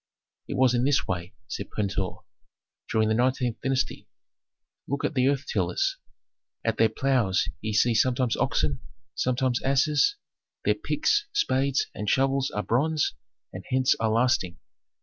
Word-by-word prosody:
"It - - -4
was 130 -2 +4
in 120 0 +1
this 140 +1 +2
way," 90 +1 -4
said - - -5
Pentuer, 100 -3 -3 0.7
"during 110 -1 +2
the 110 - +2
nineteenth 125 0 0
dynasty. 135 -1 -1 0.8
Look 140 +1 -2
at - - -1
the 130 -2 +2
earth 140 -1 0
tillers. 90 -4 0 0.7
At - - 0
their 115 0 +4
ploughs 120 -5 +1
ye 110 0 -3
see 120 +3 +3
sometimes 125 +1 +2
oxen, 70 -3 0 0.3
sometimes 130 0 0
asses; 150 - +2 0.5
their - - +4
picks, 420 0 0
spades, 140 - +1
and 105 -1 -3
shovels 135 +2 +2
are 105 - -3
bronze, 150 - +1 0.4
and - - -7
hence 130 0 +3
are 110 - +1
lasting. 110 -6 +1
125 Hz, 145 wpm, -26 LUFS, 110-135 Hz, 0.8 s, was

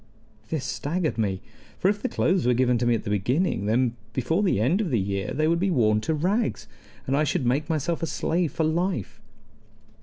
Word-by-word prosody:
This 150 -5 -2
staggered 155 -1 -2
me; 95 -4 -1 0.4
for - - +1
if 205 +1 +1
the 255 - -1
clothes 180 -5 +1
were 125 - +4
given 125 -1 +2
to 120 - 0
me 120 - +4
at - - -3
the - - -4
beginning, 110 - 0
then 120 +2 +2 0.2
before 160 - 0
the 190 - +2
end 150 - +2
of 200 - -1
the 125 - +1
year 100 0 -2
they 155 +2 +1
would 170 +1 +2
be 195 +2 +1
worn 110 - +2
to 160 +8 -1
rags, 180 - -1 0.4
and 135 - 0
I 150 - +3
should 135 -3 0
make 140 +6 0
myself 160 +1 -1
a 165 - -1
slave 165 +1 0
for 160 - -1
life. 160 - -1
145 Hz, 215 wpm, -25 LUFS, 120-170 Hz, 0.4 s, were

